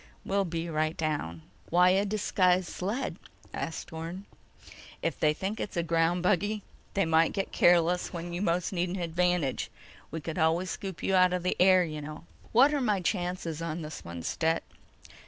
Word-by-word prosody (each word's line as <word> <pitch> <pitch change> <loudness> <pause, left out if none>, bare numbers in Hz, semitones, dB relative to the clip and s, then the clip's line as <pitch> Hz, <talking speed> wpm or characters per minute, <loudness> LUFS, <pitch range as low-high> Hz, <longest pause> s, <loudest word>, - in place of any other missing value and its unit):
"We'll 200 0 +1
be 165 -1 -3
right 155 -1 -1
down." 115 - -2 0.3
"Why 180 +2 +5
a 195 +2 +3
disguised 185 -3 +2
sled?" 210 +9 -3 0.4
asked 160 - -5
Orne. 165 +4 -6 0.8
"If - - -1
they 150 - +4
think 195 +7 -3
it's 195 - -4
a 170 - +2
ground 165 +1 +1
buggy, 205 +3 +1 0.3
they 195 -2 +3
might 160 0 +3
get 195 -2 -2
careless 175 0 +3
when 175 0 -5
you 175 - -3
most 180 0 0
need 180 0 0
an 180 - -3
advantage. 175 -4 0 0.4
We 160 - -4
could 160 +3 -5
always 165 +3 +2
scoop 190 -5 -6
you 195 - +1
out 185 -1 +5
of 180 -1 -1
the 180 - +1
air, 185 0 +6
you 155 -3 -5
know." 155 +2 -8 0.3
"What're 275 +5 +5
my 210 -5 +2
chances 175 -3 -2
on 165 0 -3
this 150 0 -7
one, 85 0 -7
Stet?" 165 - 0
175 Hz, 175 wpm, -29 LUFS, 160-185 Hz, 0.8 s, air